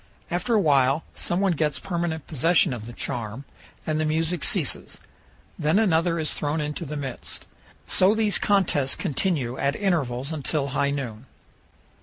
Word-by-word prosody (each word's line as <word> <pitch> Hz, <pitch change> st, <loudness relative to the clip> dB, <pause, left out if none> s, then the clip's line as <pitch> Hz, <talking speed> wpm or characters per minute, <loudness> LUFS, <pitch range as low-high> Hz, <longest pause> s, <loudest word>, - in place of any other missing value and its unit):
After 180 Hz, +7 st, +1 dB
a -, -, +5 dB
while 140 Hz, -3 st, +3 dB
some 175 Hz, +2 st, -1 dB
one 195 Hz, -2 st, +3 dB
gets 155 Hz, -2 st, 0 dB
permanent 170 Hz, -4 st, -2 dB
possession 165 Hz, +1 st, +3 dB
of 115 Hz, -2 st, -6 dB
the -, -, -7 dB
charm 115 Hz, +2 st, -5 dB, 0.4 s
and 155 Hz, -1 st, 0 dB
the -, -, +1 dB
music 160 Hz, +2 st, 0 dB
ceases. -, -, 0 dB, 0.6 s
Then 155 Hz, +5 st, +2 dB
another 170 Hz, -5 st, +3 dB
is 155 Hz, -2 st, +1 dB
thrown 150 Hz, +2 st, -1 dB
into 150 Hz, +3 st, -3 dB
the 150 Hz, +2 st, -4 dB
midst. 135 Hz, -4 st, -6 dB, 0.4 s
So 190 Hz, +3 st, +4 dB
these 215 Hz, -2 st, +2 dB
contests 170 Hz, -9 st, +2 dB
continue 145 Hz, -6 st, -1 dB
at 140 Hz, +1 st, +1 dB
intervals 140 Hz, -9 st, -1 dB
until 145 Hz, -2 st, -1 dB
high 140 Hz, +1 st, +1 dB
noon. 130 Hz, -4 st, -4 dB
155 Hz, 155 wpm, -25 LUFS, 140-175 Hz, 0.6 s, a